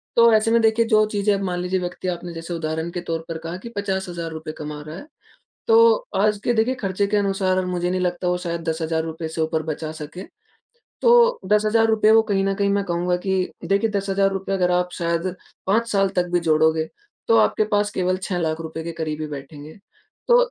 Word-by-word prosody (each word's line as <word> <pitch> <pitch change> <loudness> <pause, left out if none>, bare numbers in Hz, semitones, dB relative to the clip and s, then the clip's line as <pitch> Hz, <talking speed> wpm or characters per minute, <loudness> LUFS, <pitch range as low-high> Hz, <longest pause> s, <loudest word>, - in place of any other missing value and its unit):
तो 235 -1 +6
ऐसे 220 +1 +3
में 230 0 +4
देखिए 225 +1 +3
जो 215 -2 +4
चीज़ें 205 0 +1
आप 195 - -3
मान 180 -1 -2
लीजिए 185 +1 -1
व्यक्ति 180 +1 -5
आपने 175 -1 -4
जैसे 165 +1 -6
उदाहरण 160 0 -3
के 175 - -4
तौर 165 -1 -4
पर 165 -1 -4
कहा 165 +2 -6
कि - - -5
₹50,000 175 -5 -4
कमा 150 -1 -6
रहा 155 - -7
है। 285 - -9 0.6
तो 460 0 +7 0.2
आज 210 +1 +2
के 240 - +2
देखिए 225 +4 +2
खर्चे 200 -5 -1
के 210 +1 0
अनुसार 195 -2 +1
और 185 -1 0
मुझे 180 -1 -1
नहीं 185 0 -1
लगता 180 0 -1
वो 180 0 +1
शायद 170 0 -2
₹10,000 160 0 -2
से 160 +1 -5
ऊपर 160 0 0
बचा 155 0 -4
सके। 155 +3 -8 0.8
तो 475 0 +5
₹10,000 215 0 +3
वो 225 0 +6
कहीं 195 0 +2
न 195 0 +1
कहीं 200 0 0
मैं 200 0 +1
कहूँगा 175 0 0
कि 190 -1 0
देखिए 200 +5 +1
₹10,000 195 0 0
अगर 180 -2 +1
आप 180 0 0
शायद 170 +1 -2 0.3
5 225 +4 +2
साल 195 -1 +3
तक 180 - +2
भी 175 - +3
जोड़ोगे, 160 -1 +2 0.4
तो 230 - +5
आपके 215 -1 +3
पास 205 -1 +1
केवल 185 -1 0
₹6,00,000 160 -3 -3
के 170 - -4
करीब 155 -2 -4
ही 155 - -2
बैठेंगे। 145 +3 -9 0.5
तो 480 - +7
180 Hz, 200 wpm, -22 LUFS, 165-205 Hz, 0.8 s, तो